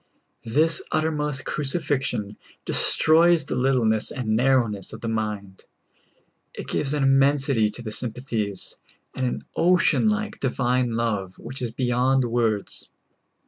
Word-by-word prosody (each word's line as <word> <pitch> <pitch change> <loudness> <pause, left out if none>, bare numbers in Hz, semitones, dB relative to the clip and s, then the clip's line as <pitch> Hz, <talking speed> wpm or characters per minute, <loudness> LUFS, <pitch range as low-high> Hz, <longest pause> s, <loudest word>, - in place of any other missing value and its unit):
This 155 +7 +3
uttermost 150 -4 -1
crucifixion 135 - -1 0.3
destroys 165 -1 +3
the - - -3
littleness 120 -5 +2
and 125 -6 -4
narrowness 120 -5 +1
of 110 - -9
the 115 - -4
mind; 105 -3 -4 0.9
it - - -7
gives 145 0 -1
an 145 - 0
immensity 135 -4 +3
to 120 +3 -9
the 110 - -5
sympathies, 110 -4 -4 0.4
and 130 -1 -1
an - - -3
ocean 180 +5 +3
like 215 0 -2
divine 125 -2 0
love, 105 -5 -2
which 130 +3 -7
is 120 - -1
beyond 125 +2 +1
words. 115 -3 -1
125 Hz, 125 wpm, -24 LUFS, 110-140 Hz, 0.9 s, This